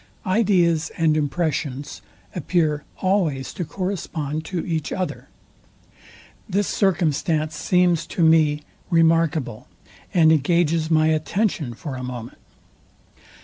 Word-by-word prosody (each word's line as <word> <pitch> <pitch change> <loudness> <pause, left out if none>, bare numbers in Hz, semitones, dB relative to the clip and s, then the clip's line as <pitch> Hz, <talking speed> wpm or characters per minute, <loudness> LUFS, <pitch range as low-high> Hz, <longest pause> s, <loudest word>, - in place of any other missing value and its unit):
Ideas 180 -5 +2
and 160 -2 +3
impressions 145 -2 -2 0.3
appear 155 -3 0 0.2
always 175 -9 0
to 180 - -3
correspond 160 -5 -4
to 180 -3 -3
each 160 -3 -2
other. 185 -1 -4 1.2
This 200 +1 +1
circumstance 160 -4 0
seems 180 -2 +2
to 170 - -1
me 155 -2 +4 0.3
remarkable, 165 -7 +2 0.4
and 160 -3 +5
engages 160 +1 +2
my 155 -1 +3
attention 155 - -1
for 135 +3 -6
a 130 - -6
moment. 125 -2 -7
160 Hz, 105 wpm, -22 LUFS, 150-175 Hz, 1.2 s, and